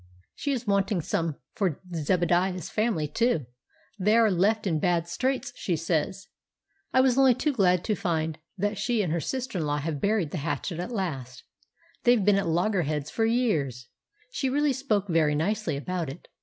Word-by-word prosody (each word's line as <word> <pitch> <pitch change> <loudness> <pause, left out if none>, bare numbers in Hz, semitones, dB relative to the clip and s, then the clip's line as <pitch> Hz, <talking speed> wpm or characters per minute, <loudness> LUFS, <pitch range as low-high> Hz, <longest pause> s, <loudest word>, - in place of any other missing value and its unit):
"She 285 - -3
is 245 -3 -2
wanting 200 -1 +1
some 165 0 -1 0.2
for 185 -8 -1
Zebadiah's 175 +2 +1
family 210 -9 0
too; 230 - +1 0.5
they 210 +4 +3
are 225 -2 +5
left 210 +5 +2
in 165 -5 +1
bad 170 0 +1
straits, 260 +7 -1
she 175 - -1
says. 165 +4 -1 0.6
I 260 - +5
was 260 0 +3
only 265 -3 +6
too 295 +4 0
glad 180 -6 +3
to 215 - 0
find 160 -5 -1 0.2
that 205 +1 -1
she 235 -4 +1
and 165 -4 -1
her 170 - 0
sister 255 +1 -3
in 155 - -1
law 145 0 0
have 150 -1 -3
buried 200 -7 +1
the 175 - -3
hatchet 165 +3 -3
at 180 +7 -4
last; 135 - -4 0.6
they've 240 -5 +4
been 205 -1 +5
at 195 - -2
loggerheads 165 -4 0
for 225 - +1
years; 155 - 0 0.4
she 270 - -1
really 290 +1 +2
spoke 220 -7 0
very 160 -4 +2
nicely 200 0 -1
about 170 +1 -3
it. 140 +6 -10
185 Hz, 180 wpm, -27 LUFS, 160-225 Hz, 0.6 s, only